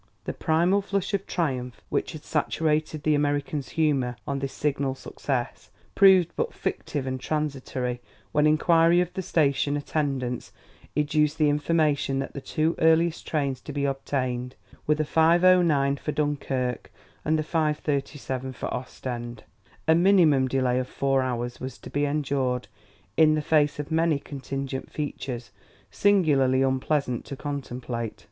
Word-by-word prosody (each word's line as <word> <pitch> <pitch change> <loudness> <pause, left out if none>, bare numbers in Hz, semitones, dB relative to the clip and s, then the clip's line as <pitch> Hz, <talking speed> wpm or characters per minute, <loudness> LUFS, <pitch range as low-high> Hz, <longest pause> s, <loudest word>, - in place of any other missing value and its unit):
The - - -4
primal 175 +5 +2
flush 200 0 -2
of 200 -1 -1
triumph 130 -8 -2
which - - -1
had - - -9
saturated 155 -1 0
the 155 - +3
American's 145 -1 -1
humor 140 -6 +1
on 140 -1 -2
this 135 0 -3
signal 140 -2 -1
success, 130 -2 -4 0.2
proved 190 -3 +6
but 470 0 -2
fictive 145 -3 -3
and 130 0 -3
transitory 130 -4 -3 0.3
when 150 0 +3
inquiry 165 +2 +4
of 180 0 -1
the 190 - -3
station 145 -4 +1
attendants 135 -4 -2 0.5
educed 150 +1 +2
the 150 -2 +3
information 150 -2 +1
that 135 0 -3
the 140 - -6
two 155 +4 0
earliest 160 +1 +3
trains 140 -4 -1
to - - -8
be 140 0 -1
obtained 130 -2 -2 0.3
were 150 - +4
the 155 - 0
5:09 165 -4 +4
for 150 - -3
Dunkerque 135 -5 -2 0.3
and 155 +1 +2
the 155 - 0
5:37 145 -4 -2
for - - -4
Ostend. 120 -1 -6 0.4
A 160 - +6
minimum 165 -7 +5
delay 130 -1 +1
of 130 - -3
four 135 -1 +1
hours 120 -1 -3
was 130 0 -6
to - - -11
be 145 0 +1
endured 135 -4 -1 0.5
in 155 -1 +6
the 155 - 0
face 150 -1 +2
of 150 +2 -5
many 160 -1 +2
contingent 135 -1 -5
features 130 -6 -5 0.4
singularly 135 - +3
unpleasant 130 -1 0
to 140 - -6
contemplate. 125 -5 -5
145 Hz, 145 wpm, -26 LUFS, 130-155 Hz, 0.5 s, proved